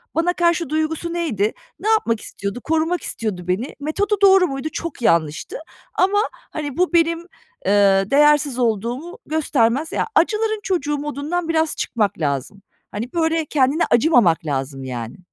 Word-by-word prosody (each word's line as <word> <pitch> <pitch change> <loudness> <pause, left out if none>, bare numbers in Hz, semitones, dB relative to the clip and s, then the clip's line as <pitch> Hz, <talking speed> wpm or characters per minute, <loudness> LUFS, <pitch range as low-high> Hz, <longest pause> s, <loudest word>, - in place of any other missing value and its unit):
Bana 335 +2 +2
karşı 340 -3 +1
duygusu 315 +2 -2
neydi? 235 - 0 0.3
Ne 430 - -4
yapmak 235 - +2
istiyordu? 200 +4 -5
Korumak 325 +2 0
istiyordu 185 -6 -4
beni. 200 +9 -2
Metodu 400 +9 0
doğru 385 -2 +6
muydu? 270 +1 -4
Çok 330 -5 -5
yanlıştı 155 -8 +1 0.4
ama, 395 +2 +2 0.3
hani, 290 -3 -5
bu, 360 0 +1
benim, 335 0 +3 0.5
eee, 195 -1 +4
değersiz 295 -2 +4
olduğumu 240 - -2
göstermez. 295 -2 +1
Ya, - - -1
acıların 430 +4 +2
çocuğu 295 -6 -1
modundan 295 +4 -3
biraz 320 -1 +1
çıkmak 210 -7 -1
lazım. 145 +6 -2 0.3
Hani, 225 +5 -5
böyle, 325 -1 +1
kendine 285 +2 +2
acımamak 235 - +4
lazım 135 -2 -3
yani. 120 - -6
290 Hz, 140 wpm, -21 LUFS, 210-335 Hz, 0.5 s, doğru